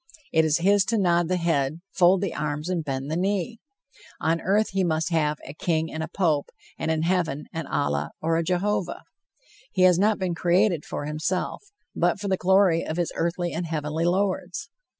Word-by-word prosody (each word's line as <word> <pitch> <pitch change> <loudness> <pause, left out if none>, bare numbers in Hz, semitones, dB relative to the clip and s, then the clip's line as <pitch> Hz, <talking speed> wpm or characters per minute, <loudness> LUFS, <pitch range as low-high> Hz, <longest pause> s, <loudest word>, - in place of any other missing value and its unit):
It 160 -1 +4
is 155 0 +3
his 200 +3 +4
to 230 - 0
nod 175 -3 +2
the 185 +1 +1
head, 160 -3 0
fold 185 +1 +4
the 195 -4 -2
arms 150 +2 -3
and 175 -3 -1
bend 135 0 -4
the - - 0
knee. 200 +5 -1 0.6
On 165 +1 0
earth 205 +4 +2
he 195 0 +1
must 160 0 0
have 150 -2 +1
a 140 - -8
king 160 0 -1
and 160 - -3
a 160 - -3
pope, 160 -4 0 0.3
and - - -2
in 160 0 +1
heaven 165 -5 0
an 165 -3 -4
Allah 75 +1 -1
or 165 +1 0
a 165 - +1
Jehovah. 185 +3 -1 0.7
He 185 - +2
has 180 -1 +6
not 210 +2 +3
been 185 -2 -1
created 175 -1 +2
for - - -5
himself, 155 +5 -2 0.3
but - - +1
for 200 0 -3
the 190 - +3
glory 185 -2 +3
of 160 - -4
his 175 -2 0
earthly 170 +1 -1
and 170 +1 -3
heavenly 155 +1 -2
Lords. 190 - -1
170 Hz, 195 wpm, -25 LUFS, 160-185 Hz, 0.7 s, has